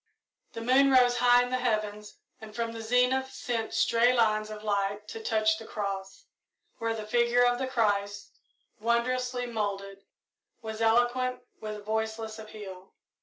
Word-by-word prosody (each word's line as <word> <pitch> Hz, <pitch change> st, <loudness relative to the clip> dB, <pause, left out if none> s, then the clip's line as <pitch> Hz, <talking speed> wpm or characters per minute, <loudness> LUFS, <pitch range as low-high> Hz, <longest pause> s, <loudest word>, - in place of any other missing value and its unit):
The 230 Hz, -, -6 dB
moon 260 Hz, +4 st, +4 dB
rose 250 Hz, -2 st, +5 dB
high 245 Hz, 0 st, +5 dB
in 245 Hz, -, -5 dB
the 255 Hz, -, 0 dB
heavens 210 Hz, -3 st, -2 dB, 0.2 s
and 220 Hz, -1 st, -11 dB
from 230 Hz, -1 st, -2 dB
the 230 Hz, 0 st, -7 dB
zenith 250 Hz, +3 st, +2 dB
sent 230 Hz, -2 st, -3 dB
stray 235 Hz, +2 st, +3 dB
lines 215 Hz, -3 st, +2 dB
of 215 Hz, 0 st, -8 dB
light 205 Hz, 0 st, -1 dB
to 225 Hz, -, -7 dB
touch 215 Hz, 0 st, +1 dB
the 225 Hz, -, -10 dB
cross, 195 Hz, -2 st, -5 dB, 0.5 s
where 230 Hz, 0 st, -1 dB
the 215 Hz, -1 st, -6 dB
figure 240 Hz, +2 st, +3 dB
of 245 Hz, 0 st, +2 dB
the 265 Hz, -, -1 dB
Christ, 205 Hz, -5 st, -1 dB, 0.5 s
wondrously 245 Hz, +2 st, 0 dB
moulded, 200 Hz, -4 st, -4 dB, 0.6 s
was 220 Hz, -1 st, -6 dB
eloquent 245 Hz, +2 st, +2 dB, 0.2 s
with 215 Hz, -1 st, -7 dB
voiceless 220 Hz, 0 st, -3 dB
appeal. 200 Hz, -4 st, -10 dB
225 Hz, 150 wpm, -28 LUFS, 215-245 Hz, 0.6 s, rose